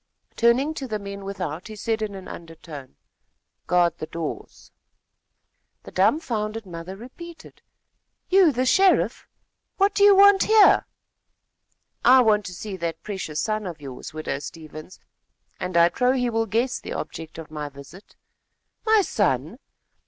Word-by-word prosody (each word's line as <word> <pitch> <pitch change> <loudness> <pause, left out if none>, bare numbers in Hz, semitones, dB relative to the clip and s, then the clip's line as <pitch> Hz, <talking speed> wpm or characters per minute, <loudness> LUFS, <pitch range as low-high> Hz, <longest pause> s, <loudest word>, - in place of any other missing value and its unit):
Turning 250 +6 +3
to 275 -4 -6
the 215 -3 -2
men 200 -1 -8
without, 180 -4 -5
he 215 - -9
said 220 +1 -2
in 210 -2 -3
an 190 -1 -9
undertone: 160 - -10 0.7
"Guard 175 -1 +2
the 155 - -5
doors." 165 -2 -7 1.1
The - - -11
dumfounded 215 - 0
mother 175 +1 -8
repeated: 320 - -12 0.7
"You 370 -4 +5
the 255 0 -1
sheriff! 385 +6 +3 0.5
What 400 +1 +3
do 405 - +2
you 405 -1 +8
want 400 0 +6
here?" 435 -1 +5 1.2
"I 255 +1 +7
want 210 -3 +3
to 180 - -7
see 205 +1 -6
that 170 -2 -4
precious 190 -7 -5
son 215 -2 -2
of 170 -3 -7
yours, 135 -1 -9
widow 155 -2 -4
Stevens, 155 +2 -10 0.6
and 180 -1 -2
I 170 0 +7
trow 250 +7 +1
he 250 -2 0
will 225 0 0
guess 235 +4 0
the - - -7
object 160 -1 -7
of 160 -2 -9
my 150 -1 -5
visit." 140 +7 -14 0.7
"My 435 -2 +4
son! 175 - -1
210 Hz, 145 wpm, -24 LUFS, 165-255 Hz, 1.2 s, you